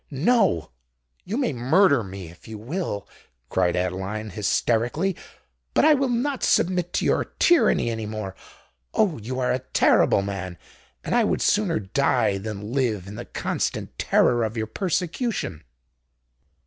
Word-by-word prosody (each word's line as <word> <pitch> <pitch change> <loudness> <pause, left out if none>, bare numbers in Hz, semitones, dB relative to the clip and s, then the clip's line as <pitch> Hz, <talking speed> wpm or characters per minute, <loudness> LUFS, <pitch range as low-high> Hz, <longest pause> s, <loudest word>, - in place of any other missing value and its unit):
"No—you 80 - -1
may 265 - 0
murder 140 - +3
me 95 -3 -8
if 85 - -18
you 110 -1 -7
will," 120 - -4 0.4
cried 90 -2 +1
Adeline, 95 +4 -3
hysterically: 120 - 0 0.6
"but - - +5
I 310 - +7
will 275 -2 +1
not 255 +3 -1
submit 180 -1 +2
to - - 0
your - - +2
tyranny 335 - +4
any 110 -2 -4
more. 105 -3 -5 0.6
Oh! 190 - +2
you 130 +4 -5
are 125 - +1
a 130 - 0
terrible 120 -5 +3
man—and 95 -3 -7
I - - +4
would - - 0
sooner 205 -6 +2
die 95 0 +1
than 105 +2 -6
live 115 -9 0
in 100 - -9
the - - -7
constant - - -3
terror 120 -1 +3
of 110 +1 -3
your 110 - -1
persecution!" 180 - -2
115 Hz, 140 wpm, -24 LUFS, -, 0.6 s, I